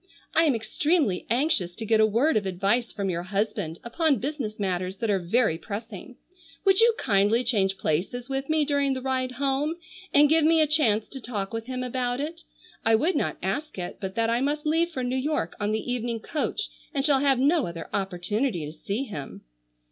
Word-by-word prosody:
I 330 - +5
am 285 -5 +3
extremely 275 - 0
anxious 235 - +1
to 225 - -5
get 220 0 +3
a 220 - +6
word 245 +9 +2
of 205 -2 +1
advice 200 +6 0
from 195 -2 -2
your 170 -1 -2
husband 200 -3 -2
upon 285 +4 +1
business 245 -4 -4
matters 185 -1 -2
that 220 +1 0
are 195 - +2
very 175 -1 +1
pressing. 220 +3 -7 0.5
Would 385 -1 +5
you 460 0 +5
kindly 210 +2 +2
change 195 -5 +1
places 200 +11 -1
with 270 +1 -3
me 310 -1 +3
during 280 -2 +1
the 260 - -4
ride 260 -1 -1
home, 280 +4 0 0.4
and 295 +1 +6
give 320 +1 +4
me 325 +1 +5
a 310 - +5
chance 240 -9 +2
to 270 - -8
talk 210 -4 -4
with 225 +1 -4
him 255 -1 -3
about 250 0 -1
it? 325 +4 -4 0.4
I 225 0 +5
would 320 +11 +1
not - - 0
ask 305 -5 -2
it 175 -1 -5
but 190 0 -4
that 230 0 +1
I 235 +1 +1
must 295 +2 -1
leave 325 +3 +2
for 265 -7 -4
New 250 +1 -1
York 265 - -1
on 205 0 0
the 220 +3 -2
evening 235 -1 -2
coach 300 +7 -2 0.3
and 275 0 +1
shall 285 -3 +4
have 275 -1 +3
no 290 +3 +3
other 170 -1 -6
opportunity 195 - -1
to 150 - -7
see 200 - -3
him." 155 - -7
240 Hz, 205 wpm, -26 LUFS, 200-285 Hz, 0.5 s, a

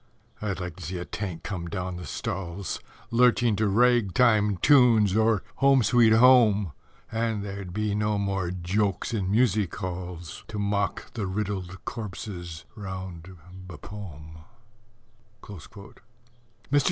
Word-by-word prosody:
I'd 100 -4 -2
like 90 0 -6
to 90 - -9
see 90 +4 -4
a 90 - -5
Tank 90 -6 -5
come 90 -4 -4
down 90 -1 -4
the 90 -4 -7
stalls, 90 +4 -4 0.3
Lurching 120 -1 +4
to 110 +1 +2
rag 115 -1 +3
time 105 -5 +4
tunes, 115 -7 +5
or 110 -2 +3
"Home, 135 -2 +5
sweet 115 -1 +5
Home," 110 - +5 0.4
And 110 -2 -1
there'd 100 -2 -6
be 105 +2 -1
no 105 0 0
more 95 -3 -1
jokes 95 +4 -1
in 100 -4 -1
Music 105 -4 +2
halls 90 -3 -6
To 115 - -6
mock 100 -1 -1
the 110 -5 -3
riddled 95 -2 -4
corpses 90 -6 -6
round 95 -3 -7 0.3
Bapaume. 80 -3 -10 1.0
Mr. 100 +1 -11
100 Hz, 130 wpm, -26 LUFS, 90-110 Hz, 1.0 s, tunes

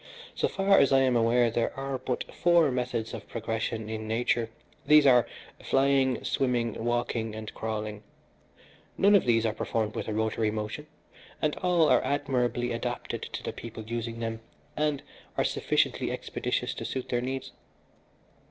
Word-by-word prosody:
So - - +1
far 195 0 +3
as 140 - +4
I 135 0 +5
am 130 -2 +3
aware 115 0 +3
there 115 +2 -1
are 135 -1 -3
but 125 -1 -2
four 170 -4 +4
methods 125 -3 -2
of - - -7
progression 115 -1 -3
in 110 0 -5
nature 115 0 0 0.4
these 150 -1 +7
are, 125 -4 +6 0.4
flying, 135 -1 +2
swimming, 120 -4 0
walking 120 -2 -1
and 110 -1 -7
crawling. 110 -1 -4 1.0
None 200 +1 +5
of 200 - +5
these 115 -2 +3
are 110 - +1
performed 110 -1 -2
with - - -4
a 110 - -2
rotary 110 0 0
motion, 110 +8 -4 0.5
and 150 -1 0
all 175 -3 +3
are - - +4
admirably 125 -4 0
adapted 120 +1 -3
to - - -6
the - - -4
people 115 -1 -8
using 115 +1 -4
them, 115 -1 -3 0.4
and 150 -2 0 0.3
are - - +3
sufficiently - - 0
expeditious - - -2
to - - -6
suit 130 -1 -4
their 120 -1 0
needs. 130 +1 -4
120 Hz, 160 wpm, -28 LUFS, 115-135 Hz, 1.0 s, these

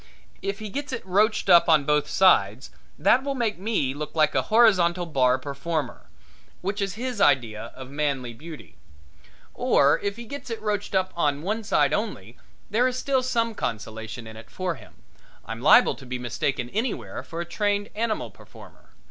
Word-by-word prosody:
If 195 0 -3
he 215 0 -7
gets 285 +6 -5
it 230 -6 -5
roached 210 +4 +2
up 170 0 +6
on 155 -3 +5
both 150 0 +2
sides 130 - +3 0.3
that 220 - +3
will 280 0 -2
make 230 -7 -1
me 190 - 0
look 150 +2 -6
like 155 -1 +3
a - - +2
horizontal 185 -6 +3
bar 130 -5 +2
performer, 140 +1 -4 0.5
which 200 +3 -3
is 200 0 -2
his 245 -2 -4
idea 115 - +2
of 130 0 -10
manly 140 -4 -2
beauty. 155 +5 -11 0.8
Or 140 +1 +3
if 200 0 -3
he 235 +1 -9
gets 280 +1 -8
it 230 - -4
roached 205 -2 -2
up 185 0 +1
on 145 -3 0
one 215 +4 -2
side 145 -7 +2
only 125 - -3 0.4
there 240 +4 +3
is 255 0 -2
still 265 0 +1
some 230 -3 0
consolation 110 - -5
in 110 0 -10
it 110 - -12
for 185 -2 -3
him - - -16 0.4
I'm 115 +1 -6
liable 145 - +6
to 135 - -13
be 125 0 -3
mistaken 125 +1 -2
anywhere 200 - -3
for 165 +6 -8
a 170 - -3
trained 205 +3 -1
animal 220 0 -2
performer. - - -17
170 Hz, 180 wpm, -25 LUFS, 135-215 Hz, 0.8 s, up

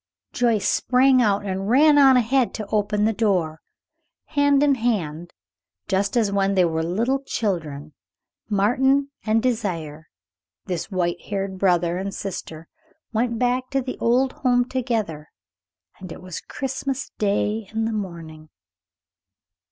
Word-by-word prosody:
Joyce 230 -4 +1
sprang 255 0 +3
out 205 -2 +1
and 195 +1 -3
ran 290 +4 +5
on 270 -2 +7
ahead 250 +1 +1
to 215 - -5
open 210 0 +1
the 225 - +2
door. 180 -8 0 0.7
Hand 285 -1 +3
in 290 -1 +4
hand, 175 - -2 0.6
just 200 +5 0
as 215 -4 +2
when 195 0 +1
they 185 -2 +4
were 160 -1 -1
little 230 +11 0
children, 160 - -3 0.6
Martin 265 +7 +2 0.2
and 220 +1 +2
Désiré, 170 -11 -2 0.6
this 180 -1 -4
white 175 -3 -1
haired 195 -2 -4
brother 175 -2 +2
and 195 +1 -4
sister 165 -4 -6 0.5
went 230 +1 0
back 250 +2 0
to 275 - 0
the 255 -1 -5
old 255 +3 +2
home 245 -2 +1
together; 220 - -3 0.7
and 185 -2 -9
it 180 - -10
was 185 -3 -6
Christmas 270 0 -4
Day, 210 0 0
in 220 0 -1
the 225 - -2
morning. 165 -6 -7
210 Hz, 135 wpm, -23 LUFS, 180-250 Hz, 0.7 s, on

